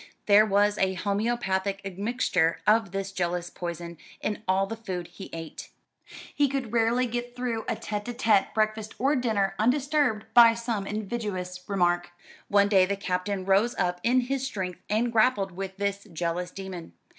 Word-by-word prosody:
There 210 +1 +6
was 205 +1 +2
a 190 0 +1
homoeopathic 200 -1 -1
admixture 195 -4 0
of 215 -1 +4
this 195 0 -3
jealous 175 -1 -2
poison 170 -1 -6 0.2
in 210 0 -3
all 190 +1 +3
the 225 - -5
food 185 -6 -5
he 195 - -10
ate. 165 -1 -8 0.6
He 290 -1 +3
could 260 -4 -3
rarely 235 +2 +2
get 240 0 -4
through 240 -3 -3
a - - 0
tête 210 0 -4
à 240 - -5
tête 215 -5 +3
breakfast 215 0 -1
or 275 +4 +2
dinner 220 -7 +1
undisturbed 260 -2 +1
by 235 -1 +8
some 230 -4 -3
invidious 200 -4 -4
remark. 175 -3 +1 0.4
One 200 0 +4
day 190 -3 +4
the 200 0 -1
Captain 185 0 -2
rose 200 +5 +3
up 180 -1 0
in 250 +4 +3
his 265 +1 -2
strength, 190 -9 -4
and 225 +3 +1
grappled 220 -4 +3
with 190 +1 -6
this 200 0 -2
jealous 170 +2 -2
demon. 185 - -8
200 Hz, 165 wpm, -27 LUFS, 185-230 Hz, 0.6 s, by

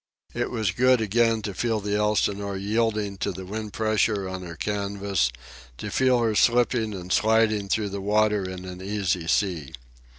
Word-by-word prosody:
It - - -2
was 110 -5 -1
good 125 +4 +4
again 115 +1 +2
to 100 - -3
feel 115 +3 0
the 105 0 -2
Elsinore 100 -1 0
yielding 105 -1 -1
to 100 - -1
the 95 0 -8
wind 105 +2 -5
pressure 110 -2 +1
on 95 0 -5
her 85 -2 -8
canvas, 100 -8 -1 0.5
to - - -6
feel 130 -1 +3
her 115 -1 +2
again 105 - +3
slipping 120 -2 +2
and 90 -1 -4
sliding 110 -2 +2
through 105 -1 0
the 100 0 -5
water 105 0 +2
in 95 0 -7
an 90 0 -8
easy 95 -4 -1
sea. 85 -6 0
105 Hz, 175 wpm, -25 LUFS, 95-110 Hz, 0.5 s, good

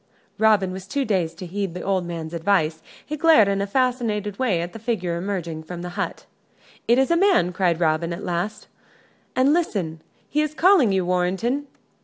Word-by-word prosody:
Robin 210 -4 +3
was 190 +1 -8
too 275 +4 -1
dazed 185 -6 -1
to 185 - -7
heed 190 0 -4
the 180 - -5
old 190 -3 0
man's 165 -1 -6
advice. 165 -2 +1 0.2
He 305 - -4
glared 305 -9 +5
in 200 0 0
a 200 - -1
fascinated 220 -4 -1
way 225 -10 +1
at 175 +1 -5
the 225 - -8
figure 205 -7 -2
emerging 170 -3 -4
from 175 +2 -8
the 180 - -5
hut. 200 +3 -4 0.6
"It 235 - +4
is 265 +4 +2
a - - +5
man," 355 - +3
cried 175 -2 +1
Robin, 165 0 +1
at 170 - -5
last, 180 +5 -3 0.7
"and 260 +3 +4
listen 185 - -1 0.3
he 300 - 0
is 305 0 -2
calling 345 - +5
you, 190 -2 +1
Warrenton." 190 +10 0
195 Hz, 190 wpm, -23 LUFS, 175-240 Hz, 0.7 s, glared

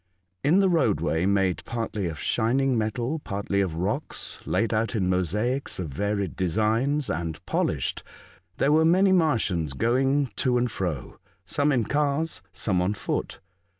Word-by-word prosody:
In 170 +8 +4
the 195 - +4
roadway, 90 - +1
made 95 -2 +1
partly 110 -5 -3
of 80 -2 -5
shining 125 - +1
metal, 120 +7 -1
partly 100 -5 -2
of 90 -5 -2
rocks 100 - -3
laid 115 0 +1
out 110 +2 0
in 95 -4 +1
mosaics 105 - -1
of 90 -4 -4
varied 100 +5 -2
designs, 110 - +1
and 80 -2 -3
polished, - - -1 0.6
there 140 - +2
were 155 +1 +5
many 185 +4 +4
Martians 110 - +1
going 130 - +1
to 125 -2 +2
and 120 -1 0
fro, 90 - -4 0.3
some 145 +7 +1
in 125 -4 +2
cars, 145 +4 0
some 95 -1 0
on 95 +4 0
foot. - - -3
110 Hz, 150 wpm, -26 LUFS, 95-140 Hz, 0.6 s, were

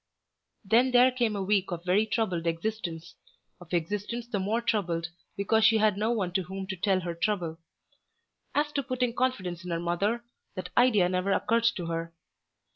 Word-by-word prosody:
Then 235 +6 +4
there 250 +1 +6
came 240 -4 0
a 195 - -2
week 195 -1 +1
of 175 0 -5
very 200 +4 +3
troubled 185 -6 -1
existence, 170 -1 -3 0.5
of 175 -2 -14
existence 205 +7 -2
the 235 -4 -3
more 210 +5 0
troubled 175 -8 -1 0.3
because 220 +3 +2
she 220 0 +6
had 215 -2 +3
no 215 +3 0
one 200 -7 0
to 190 +1 0
whom 190 +2 -6
to 190 - -2
tell 190 +1 +1
her 170 -1 -3
trouble. 170 -2 -2 1.0
As 295 +1 +1
to 285 - 0
putting 250 -2 -1
confidence 190 -10 -1
in 180 - -7
her 170 -1 -1
mother, 195 +8 0 0.3
that 185 - -6
idea 215 -8 +5
never 185 +2 0
occurred 230 +3 +2
to 175 - -4
her. 165 0 -4
195 Hz, 180 wpm, -28 LUFS, 175-225 Hz, 1.0 s, there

